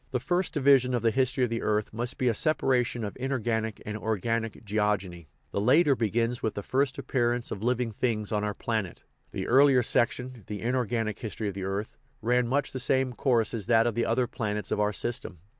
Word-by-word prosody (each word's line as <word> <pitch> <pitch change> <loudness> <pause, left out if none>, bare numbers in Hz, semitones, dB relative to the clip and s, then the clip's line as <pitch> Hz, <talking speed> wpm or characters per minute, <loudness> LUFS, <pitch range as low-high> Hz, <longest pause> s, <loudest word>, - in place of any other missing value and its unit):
The 125 - -1
first 180 +7 0
division 135 -3 +4
of 120 - -2
the 115 - +3
history 130 +1 +1
of 120 - 0
the 115 - -1
earth 105 0 0
must 120 +3 -4
be 130 - 0
a 120 - +3
separation 125 -3 +1
of 105 - -5
inorganic 115 -4 -1
and 105 - -4
organic 110 +1 -2
geogeny; 100 -5 -1 0.2
the 100 - -1
latter 140 +6 +4
begins 115 +1 0
with 110 - -2
the 100 - -4
first 135 +3 0
appearance 120 -2 0
of 100 - -4
living 120 0 0
things 110 -1 -2
on 105 -1 0
our 105 -1 -2
planet. 110 -6 -3 0.3
The - - -4
earlier 135 0 +5
section, 125 0 0
the 105 -2 -5
inor 125 0 0
ganic 115 -3 -2
history 110 -2 -3
of - - -6
the 95 0 -5
earth, 100 +3 -4 0.2
ran 125 +2 +1
much 140 +3 0
the 130 - -4
same 130 0 +1
course 120 -3 +1
as 110 -3 -4
that 115 -1 +4
of 120 - +1
the 115 +2 0
other 125 +2 +2
planets 105 -3 -3
of - - 0
our 105 0 +2
system. 115 -3 -4
115 Hz, 210 wpm, -28 LUFS, 105-125 Hz, 0.3 s, earlier